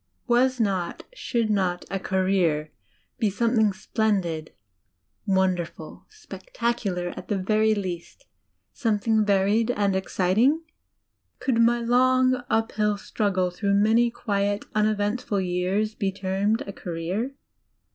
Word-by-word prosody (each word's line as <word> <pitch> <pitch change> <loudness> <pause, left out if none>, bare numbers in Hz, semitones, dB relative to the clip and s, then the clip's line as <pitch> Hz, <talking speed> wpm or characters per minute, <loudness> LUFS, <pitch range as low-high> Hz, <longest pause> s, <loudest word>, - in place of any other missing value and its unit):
Was 255 +1 +2
not 190 -5 -1
should 235 - -1
not 185 -3 0
a 195 - -1
"career" 185 -6 0 0.5
be 215 - +2
something 220 +1 +2
splendid, 190 -5 -1 0.8
wonderful, 190 -3 -1
spectacular 235 - -3
at - - -9
the 205 - 0
very 215 +3 +2
least, 185 - -6 0.5
something 220 -2 +1
varied 205 +3 +2
and 205 -5 +1
exciting? 195 - +2 0.7
Could 250 -4 0
my 235 +1 +3
long, 255 +1 +3
uphill 215 -2 +1
struggle, 190 -3 -1
through 200 +2 0
many 225 +4 +4
quiet, 205 -3 -1
uneventful 210 0 0
years, 185 +4 -1
be 200 -3 -1
termed 195 +3 -1
a 200 - -7
"career"? 185 +11 -4
205 Hz, 110 wpm, -25 LUFS, 190-230 Hz, 0.8 s, many